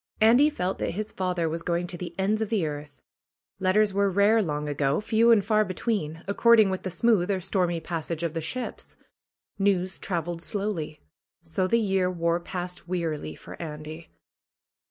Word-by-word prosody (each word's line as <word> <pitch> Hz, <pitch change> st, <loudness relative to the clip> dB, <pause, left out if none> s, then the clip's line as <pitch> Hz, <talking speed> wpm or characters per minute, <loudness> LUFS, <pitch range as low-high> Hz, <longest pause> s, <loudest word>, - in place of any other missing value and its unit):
Andy 245 Hz, +7 st, +6 dB
felt 190 Hz, -11 st, -3 dB
that -, -, -2 dB
his 215 Hz, 0 st, -3 dB
father 180 Hz, -3 st, -1 dB
was 165 Hz, +1 st, -3 dB
going 175 Hz, +1 st, -1 dB
to 175 Hz, -, -6 dB
the 175 Hz, -1 st, -7 dB
ends 205 Hz, +3 st, +1 dB
of 220 Hz, -, -1 dB
the 210 Hz, -7 st, +1 dB
earth. 145 Hz, -2 st, -6 dB, 0.6 s
Letters 195 Hz, +2 st, +3 dB
were 200 Hz, 0 st, +2 dB
rare 205 Hz, +4 st, +4 dB
long 150 Hz, -5 st, -2 dB
ago, 145 Hz, -1 st, +1 dB
few 220 Hz, +2 st, +3 dB
and 220 Hz, -4 st, +5 dB
far 215 Hz, 0 st, +3 dB
between, 185 Hz, -5 st, -2 dB
ac 200 Hz, -, 0 dB
cording 230 Hz, -4 st, +6 dB
with 190 Hz, -, -3 dB
the 185 Hz, -, -4 dB
smooth 205 Hz, -2 st, +2 dB
or 195 Hz, -2 st, +1 dB
stormy 180 Hz, -2 st, 0 dB
passage 165 Hz, 0 st, -4 dB
of 165 Hz, -2 st, -1 dB
the 165 Hz, -, -2 dB
ships. 245 Hz, +11 st, -5 dB, 0.6 s
News 190 Hz, -2 st, +1 dB
traveled 170 Hz, -2 st, -3 dB
slowly. 195 Hz, -6 st, -3 dB, 0.4 s
So 180 Hz, +3 st, -1 dB
the 230 Hz, +5 st, +3 dB
year 195 Hz, -4 st, +1 dB
wore 170 Hz, -1 st, 0 dB
past 180 Hz, 0 st, -6 dB
wearily 160 Hz, -, -3 dB
for -, -, -11 dB
Andy. 155 Hz, 0 st, -7 dB
180 Hz, 175 wpm, -26 LUFS, 165-205 Hz, 0.6 s, Andy